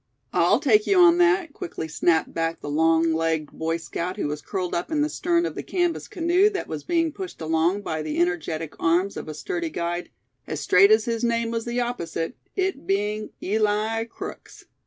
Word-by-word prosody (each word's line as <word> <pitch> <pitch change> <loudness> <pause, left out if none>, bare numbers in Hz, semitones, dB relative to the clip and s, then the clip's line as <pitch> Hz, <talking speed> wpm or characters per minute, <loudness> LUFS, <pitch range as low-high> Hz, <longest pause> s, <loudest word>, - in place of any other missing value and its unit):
"I - - +4
take 425 0 +3
you 395 - +3
on 350 -1 +7
that," 350 -3 +3
quickly 345 - -5
snapped 160 +1 +1
back 165 0 -1
the 145 - -5
long 160 +1 +3
legged 160 -2 -1
Boy 165 +1 -2
Scout 170 +2 -4
who - - -1
was 150 0 -4
curled 180 +4 -3
up 170 - -2
in 305 -2 +1
the 300 - 0
stern 340 +1 +1
of - - -3
the - - -5
canvas 350 -2 -1
canoe 355 +4 +3
that 395 -3 -4
was 155 -2 -5
being 330 -2 +1
pushed 375 +4 -7
along 165 +5 +1
by 160 -4 -3
the 155 0 -3
energetic 165 -2 -1
arms 175 +4 +2
of - - -6
a 155 - -6
sturdy 340 - -3
guide, 175 - -3 0.4
as 155 - -3
straight 195 +5 +5
as 215 0 +4
his 230 0 -2
name 235 -1 +1
was 230 -1 -2
the 240 +1 -1
opposite, 170 -5 -3 0.2
it 380 - -2
being 210 +2 -1
Eli 215 +2 +1
Crooks. 230 - -9
200 Hz, 200 wpm, -24 LUFS, -, 0.4 s, on